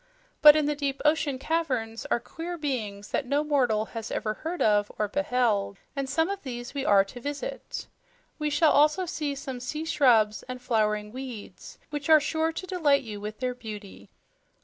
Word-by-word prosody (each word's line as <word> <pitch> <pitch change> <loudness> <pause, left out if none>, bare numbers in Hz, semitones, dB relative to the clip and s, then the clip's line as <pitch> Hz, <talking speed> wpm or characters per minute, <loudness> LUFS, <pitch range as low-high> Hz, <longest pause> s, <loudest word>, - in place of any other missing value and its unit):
But 300 0 +10
in 305 -1 +2
the 295 - +1
deep 280 -2 -2
ocean 300 -3 +2
caverns 255 -7 -2
are - - +1
queer 335 +8 -6
beings 215 -9 -3
that 265 - -1
no 285 +3 +1
mortal 250 -8 +2
has 225 -2 -5
ever 215 - -2
heard 330 +10 -5
of 205 -1 +3
or 210 - 0
beheld, 230 -6 0 0.2
and 275 -1 -2
some 320 +4 +2
of 400 0 -4
these 240 -2 -6
we 280 -2 -2
are 200 -6 +5
to 245 +5 -10
visit. 290 - -5 0.5
We 300 0 0
shall 300 +2 +4
also 305 +6 +4
see 300 -4 -3
some 265 -2 -6
sea 300 +6 -4
shrubs 235 -9 +3
and 255 0 -5
flowering 210 -4 0
weeds 255 -3 -8
which 295 0 -4
are 315 -1 +9
sure 320 +2 0
to 350 - -6
delight 315 -7 +2
you 210 -3 -7
with 215 +3 -7
their 250 -1 0
beauty." 210 - -9
265 Hz, 185 wpm, -27 LUFS, 220-300 Hz, 0.5 s, But